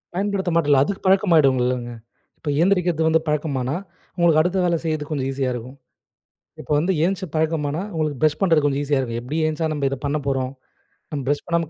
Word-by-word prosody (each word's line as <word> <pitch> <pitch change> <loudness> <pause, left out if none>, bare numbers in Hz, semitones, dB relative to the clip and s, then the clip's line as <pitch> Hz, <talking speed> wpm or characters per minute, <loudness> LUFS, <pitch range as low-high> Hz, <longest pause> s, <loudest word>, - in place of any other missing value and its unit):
பயன்படுத்த 195 -2 -1
மாட்டேல்ல, 145 -5 +4
அதுக்கு 195 +6 -4
பழக்கமாகிடுல்லங்க. 130 -10 +3 0.5
இப்போ 150 - -5
ஏந்திரிக்கிறது 175 -3 +2
வந்து 160 0 +3
பழக்கமானா, 145 -3 -1 0.4
உங்களுக்கு 170 -3 +4
அடுத்த 180 +3 0
வேலை 170 -1 +2
செய்றதுக்கு 155 -2 -3
கொஞ்சம் 135 -2 -2
ஈஸியா 135 -1 -1
இருக்கும். 125 +3 -8 0.8
இப்ப - - -12
வந்து 180 +5 +1
எந்திச்சி 190 +1 -1
பழக்கமானா, 155 0 0
உங்களுக்கு 155 -4 -1
ப்ரஷ் 155 -1 +3
பண்ணுறது 165 -6 +3
கொஞ்சம் 140 -1 +1
ஈஸியா 145 -1 +1
இருக்கும். 115 -3 -3
எப்டியும் 155 +6 -1
எந்திச்சா 160 +1 -1
நம்ம 145 -2 -1
இதை 135 - -3
பண்ண 145 +1 0
போறோம், 130 -1 -1 0.6
நம்ம 145 -3 -3
ப்ரஷ் 145 0 0
பண்ணாம 170 -2 0
155 Hz, 175 wpm, -22 LUFS, 140-170 Hz, 0.8 s, மாட்டேல்ல